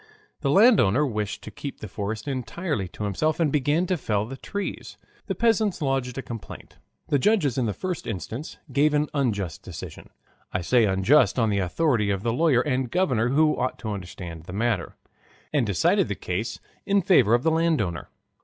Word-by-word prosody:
The 140 - -1
landowner 150 - +5
wished 105 -5 -3
to 110 - -8
keep 140 +7 -7
the 110 - -7
forest 105 +4 -5
entirely 135 - -3
to 100 - -8
himself 155 - 0
and 160 -4 +2
began 150 +5 +2
to 185 0 0
fell 105 -7 -1
the 130 +4 -7
trees. 200 +9 -5 0.3
The - - -2
peasants 220 -4 +2
lodged 135 -3 -1
a 135 - -3
complaint. 115 -3 -9 0.3
The 145 - +3
judges 160 - +2
in 125 -3 0
the 105 - -1
first 185 -2 -4
instance 115 - -5 0.2
gave 150 +1 +3
an 150 0 +1
unjust 105 - -1
decision - - -9 0.4
(I 90 - -1
say 115 +6 +3
unjust 105 +10 +3
on 115 -3 +2
the 100 - +1
authority 105 - +1
of 100 -1 -1
the 115 -1 0
lawyer 135 -2 +3
and 130 -3 -1
governor, 130 -10 +1
who 150 +3 +3
ought 130 - -2
to 110 - -5
understand 90 -4 -7
the 90 - -8
matter), 110 -2 -1 0.6
and 135 -7 +2
decided 95 -5 +2
the - - -3
case 110 +6 -3 0.2
in 200 -1 +2
favor 125 - +5
of 120 - 0
the 160 - +3
landowner. 160 - 0
125 Hz, 185 wpm, -25 LUFS, 105-150 Hz, 0.6 s, landowner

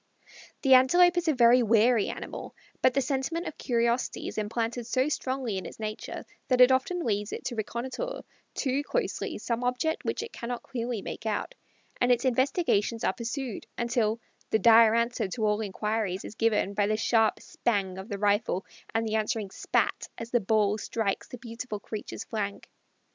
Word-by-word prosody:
The 270 -2 +6
Antelope 350 +8 +6
is 350 -1 0
a 315 - +4
very 245 0 +6
wary 230 0 +4
animal, - - -7 0.3
but 255 - +4
the 275 - +3
sentiment 275 +6 -2
of 310 - -7
curiosity 235 0 0
is - - -4
implanted 230 +2 -2
so 255 +3 +1
strongly 260 -8 -2
in 185 - -9
its - - -12
nature 215 0 -5 0.2
that 255 -1 +2
it 250 +1 +8
often 270 +8 +1
leads 205 -2 -1
it - - -6
to 245 - -3
reconnoitre 255 - -4 0.3
too 270 0 0
closely - - -2
some 235 +1 -2
object 250 +6 0
which - - -2
it 460 - -9
cannot 240 0 -5
clearly 240 -4 -4
make 220 - -6
out, 215 - -2 0.5
and 245 0 +4
its 245 +1 +2
investigations 255 - +1
are - - +2
pursued 240 -1 -5
until 235 -2 0 0.3
"the - - +3
dire 225 0 +7
answer 235 -2 0
to 220 +3 -2
all 210 +1 +1
inquiries 210 -1 -2
is - - -7
given 215 -3 +1
by 205 0 +1
the 215 0 +1
sharp 225 -1 +2
'spang' 195 -5 -2
of 190 +4 -9
the 200 - -3
rifle 205 -1 +1 0.3
and 225 0 +2
the 215 - -2
answering 215 -2 -1
'spat' - - 0
as 230 +1 -7
the 240 - +3
ball 210 0 +2
strikes 210 -2 -2
the 250 - -8
beautiful 230 -2 -6
creatures 215 +1 -6
flank." 205 -3 -4
230 Hz, 180 wpm, -28 LUFS, 215-255 Hz, 0.5 s, it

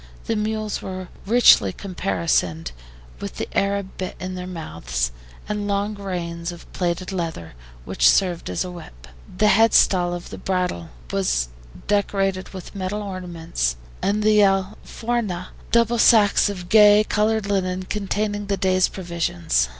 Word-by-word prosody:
The 225 - -1
mules 215 0 -2
were 185 -1 -6 0.2
richly 215 - +6
caparisoned, 165 - -1 0.5
with - - -6
the - - -3
Arab 200 -1 -1
bit 185 - -4
in 185 0 -5
their 180 0 -6
mouths, 80 - -3 0.4
and 210 -1 -2
long 200 +1 0
reins 175 -4 -4
of 175 - -11
plaited 175 0 -2
leather, 165 - -4 0.3
which - - +4
served 180 - +1
as 90 - -1
a 180 - -6
whip; 60 - -12 0.3
the 215 - +3
headstall 190 -5 +4
of 175 - -9
the - - -7
bridle 180 - -2 0.2
was 60 -11 0 0.4
decorated 195 -2 0
with 185 -2 -9
metal 200 +1 -3
ornaments, 170 - -3 0.3
and 210 +2 0
the 215 0 +5
ALFORJAS, 195 0 -1 0.2
double 235 0 +3
sacks 210 -3 +5
of 180 -3 -6
gay 210 0 +7
colored 215 0 +1
linen, 185 -2 -1
containing 205 +1 -2
the 200 -1 0
day's 185 0 +3
provisions. 125 - -1
185 Hz, 140 wpm, -22 LUFS, 170-205 Hz, 0.5 s, gay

